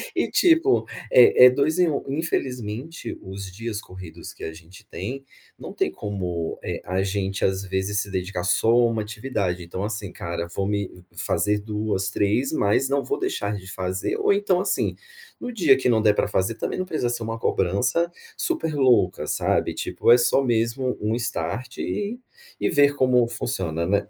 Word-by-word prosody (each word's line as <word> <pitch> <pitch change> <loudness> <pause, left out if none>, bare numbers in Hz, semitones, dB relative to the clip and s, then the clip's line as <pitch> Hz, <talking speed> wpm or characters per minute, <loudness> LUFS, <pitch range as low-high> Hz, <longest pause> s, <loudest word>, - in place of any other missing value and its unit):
e, - - +1
tipo, 350 +3 +4 0.3
é - - +8
é - - +10
2 145 +6 +1
em 175 -2 +4
1. 145 - -1
Infelizmente, 135 -2 -3
os 95 0 -7
dias 110 +2 -5
corridos 90 -5 -10
que - - -13
a 80 - -3
gente 85 +6 -15
tem, 135 +2 -5 0.3
não - - -8
tem - - 0
como 90 -5 -4
eh, - - -4
a 95 +1 -1
gente, 100 0 -1
às 95 0 0
vezes, 95 +1 -1
se 100 - -7
dedicar 90 -1 -3
só 90 - +1
a 120 +1 +5
1 115 -1 -1
atividade, 105 -5 -3
então, 90 +3 -5
assim, 105 -2 -4
cara, 85 0 -4
vou 95 - -1
me 100 -1 0 0.3
f - - -7
fazer 105 0 +1
2, 105 -2 -2
3, 105 +7 +1
mas, 130 0 +2
não 140 0 +1
vou 420 - -2
deixar 380 - -2
de 95 -1 -8
fazer 95 0 -2
ou, - - +3
então, 200 -3 +2
assim, 190 - 0 0.4
no 245 - -5
dia 165 -11 +5
que 135 - 0
não 110 -2 +3
der 105 -1 +5
pra - - +1
fazer, 100 +2 0
também, - - -3
não 185 - -1
precisa 155 -9 -1
ser 120 -1 -3
uma 115 0 -4
cobrança 115 - +1 0.2
super 320 - -1
louca, 120 - +3
sabe, - - 0
tipo, - - +1
é 120 - +9
só 125 +3 +3
mesmo 120 +1 0
um 110 +2 0
start 120 +1 -3
e 210 +4 -3 0.4
e - - +1
ver 145 -2 +4
como 125 -3 +3
funciona, 85 -8 -2
né. 100 +3 +1
110 Hz, 185 wpm, -24 LUFS, 95-135 Hz, 0.4 s, é